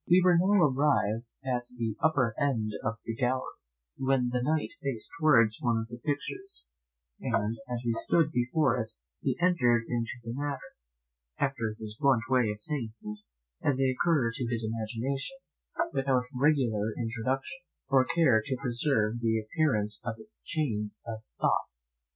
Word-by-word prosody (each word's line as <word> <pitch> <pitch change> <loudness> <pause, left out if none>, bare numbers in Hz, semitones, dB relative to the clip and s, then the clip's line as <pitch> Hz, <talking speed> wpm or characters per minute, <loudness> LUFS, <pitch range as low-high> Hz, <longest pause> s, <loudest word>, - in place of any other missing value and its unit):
We 175 +2 +7
were 180 -1 +6
now 190 +2 +4
arrived 125 -6 +2 0.2
at 125 -2 -1
the 115 -3 -1
upper 130 -7 +3
end 120 -7 +1
of 105 +2 -1
the 115 - -2
gallery, 125 +2 -1 0.4
when 130 -2 +2
the 125 0 0
Knight 155 +4 +1
faced 135 -6 -3
towards 115 -7 +4
one 120 -4 +2
of 115 0 -3
the 120 +1 -8
pictures, 385 - -4 0.5
and 110 +2 -1
as 120 0 -3
we 115 - +2
stood 155 +6 +3
before 125 +1 +2
it 110 - -5 0.3
he 130 -2 0
entered 125 -10 +3
into 115 -3 -1
the 115 0 -5
matter, 140 0 -4 0.6
after 115 -6 -1
his 110 -1 -6
blunt 135 -5 +4
way 125 -4 +3
of 105 0 -5
saying 120 -7 -3
things, 105 0 -6 0.3
as 140 -3 +2
they 135 -1 +3
occur 130 -3 +2
to 125 -1 -2
his 115 -2 0
imagination, 115 - -3 0.6
without 135 -2 +2
regular 125 -6 +2
introduction, 125 +7 -2 0.3
or 135 -2 +5
care 160 -9 +4
to 130 0 -2
preserve 120 -3 +1
the 110 -1 +1
appearance 110 -3 0
of 115 -2 -3 0.3
chain 110 -10 -1
of 115 -2 -5 0.2
thought. - - +2
125 Hz, 155 wpm, -29 LUFS, 115-140 Hz, 0.6 s, We